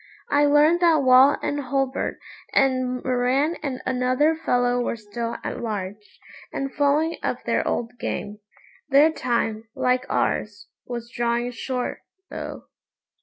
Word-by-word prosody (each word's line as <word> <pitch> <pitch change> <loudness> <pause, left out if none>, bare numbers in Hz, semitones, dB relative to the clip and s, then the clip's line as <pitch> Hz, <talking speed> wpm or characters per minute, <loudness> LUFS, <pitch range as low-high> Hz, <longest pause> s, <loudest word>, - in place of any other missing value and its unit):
I 290 0 +4
learned 295 +4 +5
that 330 -4 +4
Wall 260 +2 +6
and 290 - -1
Hulbert 270 -1 -1 0.4
and 255 -2 +1
Moran 260 +5 +1
and 265 -4 -4
another 255 +4 +2
fellow 245 -5 +1
were 240 - -1
still 230 +2 -5
at - - -4
large, 210 -2 -6 0.3
and 275 0 -4
following 295 +3 +1
up - - -3
their - - 0
old 235 0 -1
game. 210 +1 -4 0.5
Their 290 +3 +6
time, 230 -6 -1
like 255 0 +1
ours, 205 -1 -1 0.2
was 235 -1 -6
drawing 240 +1 -1
short, 250 +1 -4 0.3
though. - - -6
255 Hz, 130 wpm, -24 LUFS, 235-285 Hz, 0.5 s, Wall